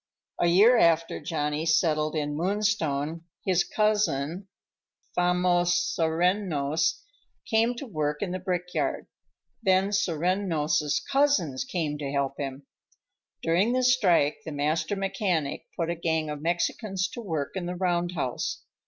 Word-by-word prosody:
A 175 - +3
year 215 +8 +6
after 165 0 +3
Johnny 150 -1 -2
settled 155 -1 +2
in 150 -1 -1
Moonstone, 165 -5 0 0.2
his 185 -2 +3
cousin, 200 -5 0 0.7
Famos 180 0 +2 0.2
Serreños, 165 -2 +1 0.4
came 230 +2 +2
to 260 - -6
work 150 - -2
in 185 - -3
the 185 - -3
brickyard; 180 -1 -2 0.6
then 190 -2 +3
Serreños' 165 -5 0
cousins 270 - +2
came 155 -5 -3
to 140 -2 -4
help 140 -1 -1
him. 135 0 -5 0.8
During 180 +8 +2
the 255 0 +1
strike, 185 - +3
the 160 - -6
master 155 +7 -1
mechanic 190 -6 -2
put 170 0 -1
a - - -2
gang 160 -2 -1
of 150 -1 -6
Mexicans 185 +4 -1
to 240 - -7
work 160 -9 -3
in 180 -2 -3
the 180 - -3
roundhouse. 175 -7 -2
170 Hz, 125 wpm, -27 LUFS, 150-190 Hz, 0.8 s, year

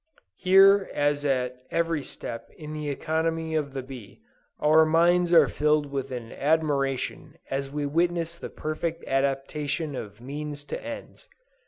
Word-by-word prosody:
Here 195 +1 +6
as 145 0 +1
at 125 -2 0
every 165 -3 0
step 115 -3 -7
in 155 -1 -7
the 150 -1 -4
economy 160 +2 -1
of 150 -3 -1
the 135 -1 -4
bee 125 -6 -11 0.4
our 155 +1 +6
minds 170 +2 +3
are 170 - +7
filled 150 -1 +1
with 135 -1 -3
admiration 140 +2 -1 0.2
as 135 0 -2
we 145 +1 -3
witness 170 +2 0
the - - -6
perfect 160 +2 -4
adaptation 140 +3 -1
of 105 -3 -7
means 145 +3 -6
to - - -6
ends. 290 - -9
150 Hz, 140 wpm, -26 LUFS, 135-165 Hz, 0.4 s, are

